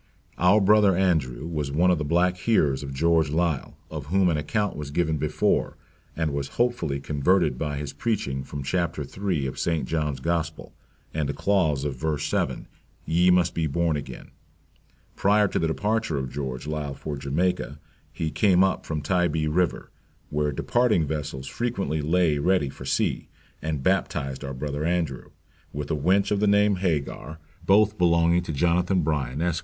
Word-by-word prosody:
"Our 90 Hz, +5 st, +5 dB
Brother 100 Hz, -2 st, +4 dB
Andrew 80 Hz, -9 st, 0 dB
was 75 Hz, -4 st, -3 dB
one 90 Hz, +5 st, +3 dB
of 90 Hz, -, +1 dB
the -, -, -1 dB
black 90 Hz, +4 st, +2 dB
hearers 75 Hz, -10 st, +2 dB
of 70 Hz, -1 st, -6 dB
George 80 Hz, +2 st, +2 dB
Liele," 80 Hz, -2 st, -1 dB, 0.2 s
of 75 Hz, -3 st, -6 dB
whom 95 Hz, +2 st, +3 dB
an 80 Hz, -, +1 dB
account 105 Hz, +7 st, -1 dB
was 75 Hz, -2 st, -6 dB
given 80 Hz, +1 st, 0 dB
before; 75 Hz, +1 st, 0 dB, 0.4 s
and 80 Hz, -3 st, -1 dB
was 70 Hz, -1 st, -2 dB
hopefully 120 Hz, -, 0 dB
converted 75 Hz, 0 st, +1 dB
by 75 Hz, -2 st, -2 dB
his 70 Hz, -1 st, -5 dB
preaching 70 Hz, -, -2 dB
from 70 Hz, +1 st, -6 dB
chapter 85 Hz, 0 st, -1 dB
III. 90 Hz, -1 st, -2 dB
of 65 Hz, -, -4 dB
St. 80 Hz, -2 st, -1 dB
John's 75 Hz, -4 st, -1 dB
Gospel, 80 Hz, +2 st, -3 dB, 0.4 s
and 75 Hz, -3 st, -1 dB
a -, -, -1 dB
clause 80 Hz, -9 st, +1 dB
of 70 Hz, -3 st, -3 dB
verse 75 Hz, +1 st, -2 dB
7, 75 Hz, -, -1 dB, 0.4 s
Ye 85 Hz, +3 st, +3 dB
must 90 Hz, -1 st, +3 dB
be 80 Hz, -1 st, 0 dB
born 85 Hz, +2 st, 0 dB
again; 70 Hz, -, -7 dB, 0.8 s
prior 105 Hz, +1 st, +3 dB
to -, -, -1 dB
the 80 Hz, -, +1 dB
departure 105 Hz, 0 st, -1 dB
of 65 Hz, -2 st, -3 dB
George 65 Hz, -2 st, -5 dB
Liele 75 Hz, -2 st, -4 dB
for 75 Hz, +1 st, -5 dB
Jamaica, 75 Hz, +3 st, -1 dB, 0.3 s
he 80 Hz, -1 st, -3 dB
came 95 Hz, -1 st, +4 dB
up 95 Hz, -2 st, 0 dB
from 75 Hz, -2 st, -3 dB
Tybee 85 Hz, -2 st, +1 dB
River, 85 Hz, +3 st, 0 dB, 0.4 s
where 75 Hz, 0 st, 0 dB
departing 110 Hz, -, +1 dB
vessels 75 Hz, -3 st, -4 dB
frequently 100 Hz, -, -2 dB
lay 80 Hz, -1 st, +2 dB
ready 80 Hz, -2 st, +2 dB
for 65 Hz, -, -10 dB
sea, -, -, 0 dB, 0.3 s
and 75 Hz, -3 st, -3 dB
baptized 70 Hz, 0 st, -1 dB
our 70 Hz, -1 st, -5 dB
Brother 75 Hz, +2 st, -3 dB
Andrew, 80 Hz, -6 st, -1 dB, 0.4 s
with 75 Hz, 0 st, -5 dB
a -, -, +2 dB
wench 95 Hz, +8 st, +2 dB
of 105 Hz, -, +2 dB
the 105 Hz, -, +2 dB
name 100 Hz, -1 st, +4 dB
Hagar, 80 Hz, -3 st, -2 dB, 0.3 s
both 105 Hz, +1 st, +4 dB
belonging 85 Hz, 0 st, +3 dB
to 85 Hz, -, -5 dB
Jonathan 90 Hz, +4 st, +1 dB
Bryan, 75 Hz, 0 st, -1 dB
Esq. 85 Hz, -2 st, 0 dB
80 Hz, 170 wpm, -25 LUFS, 70-90 Hz, 0.8 s, Our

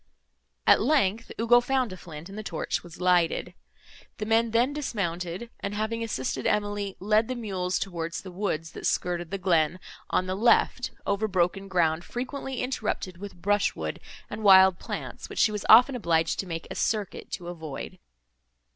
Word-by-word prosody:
At -, -, +6 dB
length, 230 Hz, -7 st, +1 dB
Ugo 240 Hz, +2 st, +5 dB
found 255 Hz, -4 st, 0 dB
a -, -, -6 dB
flint, 165 Hz, -3 st, -10 dB
and 195 Hz, -, -10 dB
the 215 Hz, -, -4 dB
torch 170 Hz, -6 st, -3 dB
was 175 Hz, -1 st, -13 dB
lighted. 180 Hz, -2 st, +2 dB, 0.6 s
The 210 Hz, -, -3 dB
men 225 Hz, +1 st, +3 dB
then 240 Hz, +5 st, +2 dB
dismounted, 195 Hz, -, -3 dB
and, 200 Hz, +1 st, -4 dB
having 220 Hz, +2 st, -2 dB
assisted 130 Hz, -, -2 dB
Emily, 205 Hz, -1 st, -1 dB
led 215 Hz, +3 st, +2 dB
the 255 Hz, -, -3 dB
mules 190 Hz, -6 st, -2 dB
towards 170 Hz, -2 st, -4 dB
the 185 Hz, -, -8 dB
woods, 175 Hz, -4 st, -3 dB
that -, -, -4 dB
skirted 175 Hz, -1 st, -1 dB
the 195 Hz, -, -3 dB
glen, 175 Hz, -2 st, +2 dB, 0.3 s
on 185 Hz, -, +1 dB
the 185 Hz, -, -2 dB
left, 220 Hz, +5 st, +3 dB, 0.2 s
over 200 Hz, +2 st, 0 dB
broken 195 Hz, 0 st, 0 dB
ground, 170 Hz, -3 st, +1 dB
frequently 260 Hz, +3 st, -4 dB
interrupted 215 Hz, -7 st, -3 dB
with 200 Hz, -2 st, -9 dB
brush 205 Hz, 0 st, +2 dB
wood -, -, -4 dB, 0.3 s
and -, -, -6 dB
wild 190 Hz, -2 st, +7 dB
plants, -, -, -6 dB
which -, -, -9 dB
she 220 Hz, -, +4 dB
was 210 Hz, -1 st, -4 dB
often 250 Hz, +4 st, +8 dB
obliged 165 Hz, -8 st, +1 dB
to 195 Hz, -, -2 dB
make 165 Hz, -1 st, -5 dB
a -, -, -5 dB
circuit 210 Hz, -4 st, -2 dB
to 175 Hz, -, -5 dB
avoid. 165 Hz, +1 st, -7 dB
195 Hz, 175 wpm, -27 LUFS, 175-220 Hz, 0.6 s, often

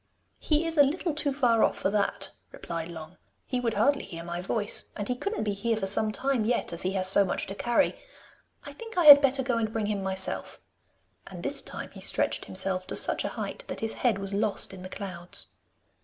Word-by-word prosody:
'He 305 Hz, +1 st, +1 dB
is 330 Hz, -1 st, -2 dB
a -, -, +10 dB
little 320 Hz, +4 st, -1 dB
too 295 Hz, -1 st, 0 dB
far 245 Hz, -5 st, +2 dB
off -, -, +1 dB
for 195 Hz, -, -1 dB
that,' 205 Hz, -1 st, -1 dB, 0.2 s
replied 165 Hz, -1 st, -6 dB
Long. 165 Hz, +1 st, -10 dB, 0.3 s
'He 255 Hz, -, -2 dB
would 230 Hz, -2 st, -1 dB
hardly 285 Hz, 0 st, +2 dB
hear 165 Hz, -1 st, -8 dB
my 170 Hz, +1 st, -5 dB
voice, 205 Hz, +3 st, 0 dB
and 205 Hz, -, -4 dB
he 250 Hz, -, -1 dB
couldn't 400 Hz, -, -3 dB
be 210 Hz, -1 st, -1 dB
here 225 Hz, +3 st, -1 dB
for 205 Hz, -, -2 dB
some 215 Hz, +2 st, +4 dB
time 265 Hz, +1 st, 0 dB
yet, 230 Hz, -4 st, 0 dB
as 170 Hz, -, -1 dB
he 185 Hz, +1 st, 0 dB
has 185 Hz, -1 st, +3 dB
so 195 Hz, +1 st, +5 dB
much 185 Hz, -, -2 dB
to 195 Hz, -, -5 dB
carry. 235 Hz, +4 st, +1 dB, 0.7 s
I -, -, -7 dB
think 455 Hz, -4 st, -10 dB
I 350 Hz, -, +3 dB
had 285 Hz, -1 st, +11 dB
better 270 Hz, -1 st, +2 dB
go 245 Hz, -2 st, 0 dB
and 220 Hz, -1 st, -2 dB
bring 220 Hz, -1 st, -2 dB
him 205 Hz, -1 st, -2 dB
myself,' 190 Hz, 0 st, -2 dB, 0.7 s
and -, -, -9 dB
this -, -, -1 dB
time -, -, -7 dB
he -, -, -12 dB
stretched -, -, +1 dB
himself 185 Hz, 0 st, -3 dB
to -, -, -4 dB
such -, -, +3 dB
a -, -, -1 dB
height -, -, -5 dB
that -, -, -6 dB
his 225 Hz, 0 st, 0 dB
head 235 Hz, -6 st, +1 dB
was 195 Hz, 0 st, -4 dB
lost 200 Hz, -1 st, -1 dB
in 190 Hz, -, -10 dB
the 185 Hz, -, -8 dB
clouds. 180 Hz, -3 st, -7 dB
215 Hz, 230 wpm, -27 LUFS, 190-265 Hz, 0.7 s, had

